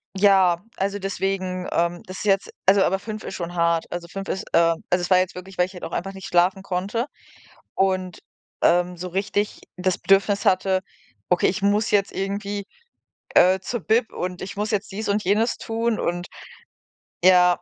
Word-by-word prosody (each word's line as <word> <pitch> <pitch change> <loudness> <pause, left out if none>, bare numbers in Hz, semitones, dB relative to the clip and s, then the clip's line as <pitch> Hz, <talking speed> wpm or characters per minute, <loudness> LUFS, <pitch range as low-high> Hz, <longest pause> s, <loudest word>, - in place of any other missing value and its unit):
ja, 190 -3 +4
also, 200 +1 -1
deswegen, 190 -2 -2
ähm 170 +1 0
das 185 0 -8
ist - - -6
jetzt 195 -1 +2 0.2
also, 195 +1 +5
aber 190 - +2
5 215 +1 -7
ist - - -6
schon 175 -1 -5
hart. 170 -1 +1
Also 175 -1 -5
5 195 +3 -7
ist, 195 - -3
ähm 165 -1 +3
also, 180 0 +2
es 180 - -3
war 185 - +6
jetzt 185 0 -1
wirklich, 185 +1 -10
weil 180 0 +3
ich 190 - -15
halt 180 - -10
auch - - -5
einfach 195 +4 -3
nicht 190 -1 -8
schlafen 185 +2 +2
konnte 195 +6 -2 0.7
und, 185 -2 0 0.4
ähm, 180 0 +3
so 180 - -5
richtig 205 +3 -2 0.2
das 185 0 0
Bedürfnis 200 +1 +2
hatte: 185 0 +2 0.5
„Okay, 180 - +3
ich 190 +1 -2
muss 205 +2 +2
jetzt 200 -1 +2
irgendwie, 200 +1 -3 0.7
äh, 185 +1 +6
zur 230 +4 -4
Bib 220 +7 +1
und 180 0 -4
ich 190 - -6
muss 210 +2 -2
jetzt 205 0 -2
dies 210 +2 -4
und 205 +1 +1
jenes 215 +5 +1
tun 230 0 -1
und 175 +1 -2 1.0
ja“, 180 -1 +6
190 Hz, 185 wpm, -23 LUFS, 180-200 Hz, 1.0 s, war